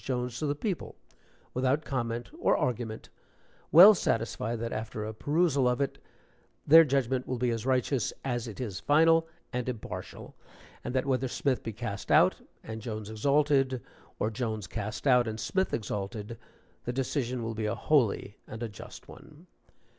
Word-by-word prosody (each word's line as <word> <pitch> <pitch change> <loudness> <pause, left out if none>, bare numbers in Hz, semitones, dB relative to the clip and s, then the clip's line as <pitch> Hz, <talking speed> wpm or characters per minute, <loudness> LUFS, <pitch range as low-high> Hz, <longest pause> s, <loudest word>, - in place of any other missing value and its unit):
Jones 125 -1 -3
to 155 - -1
the 145 - 0
people, 185 +4 -4 0.6
without 130 +4 +1
comment 120 -3 -3
or - - +3
argument, 115 -3 -3 0.6
well 185 +7 +10
satisfied 115 - -1
that 115 0 -3
after 110 0 -4
a 110 - -5
perusal 145 +2 +1
of 125 0 +1
it, 140 - -2 0.7
their 165 +3 +9
judgment 130 -3 0
will 130 - -2
be 125 0 +1
as 115 +1 -3
righteous 130 -2 +1
as 120 -2 -2
it 110 - -8
is 105 -8 -4
final 165 +2 +4 0.3
and 125 0 -2
impartial, 115 -4 -7 0.5
and 125 - -4
that 130 - +1
whether 130 -1 0
Smith 130 0 -1
be 115 - -5
cast 110 -3 -5
out - - +5 0.2
and 110 0 -7
Jones 110 -2 -5
exalted, 135 +2 +2 0.4
or 110 - -1
Jones 110 -3 -3
cast 105 +3 -5
out 125 -3 +5
and 110 0 -4
Smith 190 - 0
exalted, 105 +1 -4 0.5
the 120 - -1
decision 130 -2 -2
will 115 0 -3
be 110 -1 -2
a 105 - -1
holy 115 -8 +1
and 115 +2 -7
a - - -1
just 105 - -11
one. - - -14
125 Hz, 165 wpm, -29 LUFS, 110-135 Hz, 0.7 s, well